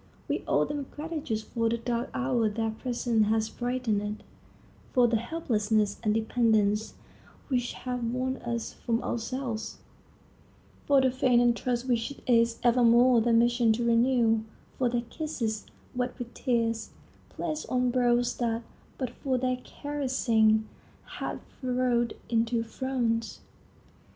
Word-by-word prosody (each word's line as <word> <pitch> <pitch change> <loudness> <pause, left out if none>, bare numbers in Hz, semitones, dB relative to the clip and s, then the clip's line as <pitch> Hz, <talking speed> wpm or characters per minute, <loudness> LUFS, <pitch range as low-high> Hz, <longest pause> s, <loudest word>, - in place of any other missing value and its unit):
We - - -1
owe - - +3
them 290 -2 -4
gratitude 300 -8 -4
for 230 0 -1
the 235 - 0
dark 235 0 -2
hour 135 - +1
their 225 +1 -1
presence 235 -1 0
has 220 0 +1
brightened; 220 -4 -2 0.7
for 250 -2 +5
the 230 -1 +2
helplessness 215 -6 0
and 215 -2 +1
dependence 220 -1 +1 0.5
which 245 -3 0
have 250 -1 -4
won 255 +3 -1
us 235 -1 -4
from 230 -1 -2
ourselves; 235 -1 -3 1.1
for 280 -2 +5
the 260 -1 +3
faith 255 -1 +3
and 240 -1 +4
trust 245 +1 -2
which 235 -2 +1
it 280 - -11
is 230 -1 +3
evermore 240 0 +5
their 235 +1 +2
mission 235 0 +4
to 235 +2 -1
renew; 235 -1 +3 0.4
for 250 -2 +2
their 240 0 0
kisses, 235 -6 -4 0.3
wet 250 0 -2
with 240 -1 -7
tears, 230 -3 0 0.4
placed 310 -2 -4
on 250 -1 +1
brows 245 -1 +2
that, 230 -1 -1 0.3
but 255 -3 -3
for 260 0 -1
their 255 0 0
caressing, 235 -7 +1 0.5
had - - -4 0.2
furrowed 250 -2 +1
into 230 0 +1
frowns. 230 -1 -2
240 Hz, 135 wpm, -28 LUFS, 225-255 Hz, 1.1 s, for